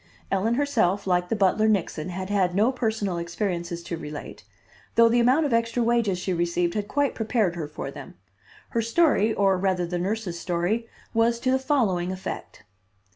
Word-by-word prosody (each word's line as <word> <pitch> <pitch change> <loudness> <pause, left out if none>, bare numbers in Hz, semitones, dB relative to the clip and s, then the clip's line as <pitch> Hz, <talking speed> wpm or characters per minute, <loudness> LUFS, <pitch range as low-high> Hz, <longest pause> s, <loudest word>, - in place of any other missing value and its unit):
Ellen 210 +5 +1
herself, 225 -9 +1
like 180 -1 +1
the - - +1
butler, 210 +2 +3
Nixon, 185 -5 0
had 185 +2 -5
had 185 -3 +1
no 215 +6 +3
personal 220 -8 -1
experiences 170 -1 -3
to 170 -1 -4
relate, 150 -2 -8 0.5
though 230 0 +7
the 235 +1 +3
amount 260 +6 +4
of 280 - 0
extra 230 +1 +1
wages 230 -5 +2
she 185 +1 -2
received 170 0 0
had 205 -1 -2
quite 285 +2 0
prepared 220 -5 0
her 160 -3 -4
for 145 -2 -6
them. - - -10 0.5
Her 230 - 0
story, 230 -2 +3
or 195 -3 +2
rather 185 -2 +1
the 175 +1 -3
nurse's 190 -2 -2
story, 180 +7 -1 0.3
was 230 +1 +2
to 255 - +1
the 265 - +3
following 210 -11 +1
effect. 185 - -7
200 Hz, 180 wpm, -25 LUFS, 175-230 Hz, 0.5 s, though